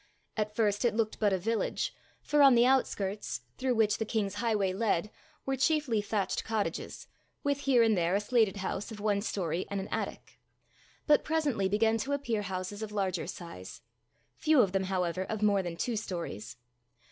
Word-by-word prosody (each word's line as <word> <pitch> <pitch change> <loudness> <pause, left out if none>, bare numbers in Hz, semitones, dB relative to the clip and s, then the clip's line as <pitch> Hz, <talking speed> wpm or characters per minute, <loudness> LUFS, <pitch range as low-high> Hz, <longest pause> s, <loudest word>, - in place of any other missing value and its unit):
At 210 -1 -2
first 210 -1 +1
it 240 - +2
looked 220 -1 -1
but 210 -2 +3
a 190 - +2
village, 220 +5 -1 0.3
for 295 0 +3
on 275 -3 +8
the 235 +1 +5
outskirts, 200 - 0 0.2
through 255 -1 +1
which 220 -2 +2
the - - +1
king's 210 -3 -1
highway 210 -5 +1
led, 210 -1 0 0.3
were 270 - 0
chiefly 270 -5 +2
thatched 205 -2 -1
cottages, 220 -2 -3 0.4
with 285 -1 +1
here 265 -4 +4
and 220 -1 +4
there 175 +1 +1
a - - +3
slated 215 -1 +2
house 195 +3 -3
of 215 - -8
one 205 -1 +1
story 180 -4 -2
and 200 - -2
an 195 - -4
attic; - - -5 0.7
but 300 -1 +5
presently 285 -12 0
began 220 +2 +2
to 275 +5 -2
appear 240 -7 -1
houses 190 +1 -4
of 215 -1 -5
larger 190 -5 -1
size 170 - -8 0.6
few 310 -4 +4
of 200 -5 +2
them, 190 0 0
however, 185 -1 -1
of 215 +1 -3
more 200 -2 +4
than 175 -2 -5
two 235 +6 -1
stories. 165 - -5
210 Hz, 180 wpm, -30 LUFS, 190-235 Hz, 0.7 s, on